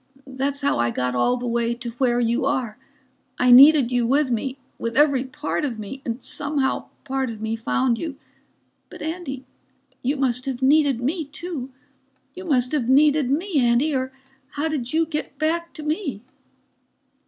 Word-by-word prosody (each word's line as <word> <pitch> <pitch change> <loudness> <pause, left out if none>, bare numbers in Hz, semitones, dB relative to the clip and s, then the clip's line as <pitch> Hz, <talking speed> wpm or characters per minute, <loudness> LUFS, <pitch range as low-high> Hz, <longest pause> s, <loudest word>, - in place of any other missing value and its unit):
That's 275 +1 -3
how 280 - +1
I 120 0 +2
got 125 +1 -2
all 185 - +2
the 245 - -5
way 235 0 0
to 235 0 -6
where 245 -2 +2
you 235 +1 +1
are. 255 -5 -1 0.6
I 250 0 +4
needed 270 0 +8
you 245 -2 +1
with 275 +1 +2
me 260 +3 -2 0.2
with 230 +1 -3
every 280 -3 +4
part 290 +3 -3
of 255 -6 -2
me, 215 +6 -7
and 235 +2 -4
somehow 280 -2 -1 0.2
part 265 -1 -2
of 225 -2 -7
me 220 +1 -2
found 235 +1 0
you. 315 -5 -4 0.7
But - - -9
Andy, 310 -5 -5 0.6
you 275 +4 -1
must 255 -1 0
have 265 -1 -3
needed 280 -3 +3
me, 310 +6 -1
too. 295 -2 -6 0.6
You 370 0 -9
must 255 -6 +1
have 270 -6 -1
needed 290 0 +4
me, 325 +3 0
Andy, 245 +5 +2
or 260 0 -2 0.4
how 295 +2 -1
did 275 -6 -3
you 325 +1 +2
get 300 -3 -5
back 335 +3 -1
to 310 - -7
me?" 300 - -3
265 Hz, 175 wpm, -23 LUFS, 245-300 Hz, 0.7 s, needed